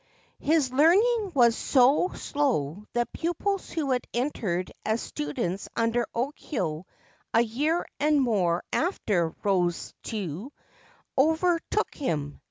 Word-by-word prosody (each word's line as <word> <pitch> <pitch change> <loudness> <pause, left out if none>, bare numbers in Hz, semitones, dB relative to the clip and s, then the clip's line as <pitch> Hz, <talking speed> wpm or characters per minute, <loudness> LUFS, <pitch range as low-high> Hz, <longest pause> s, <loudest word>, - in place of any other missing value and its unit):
His 295 -4 +2
learning 395 - +4
was 235 -3 +5
so 270 +7 +4
slow 210 - -1
that 240 0 -1
pupils 380 +3 -2
who 300 -5 -2
had 250 -1 +1
entered 210 -9 -1
as 220 +1 0
students 170 +5 -3
under 230 +1 +1
Okyo 230 - -3 0.5
a 230 - +6
year 290 +9 0
and 300 0 +3
more 190 -9 +1
after 205 - +1
Rosetsu 190 - -2 0.7
overtook 320 +4 +1
him. 150 - -3
240 Hz, 105 wpm, -27 LUFS, 190-305 Hz, 0.7 s, a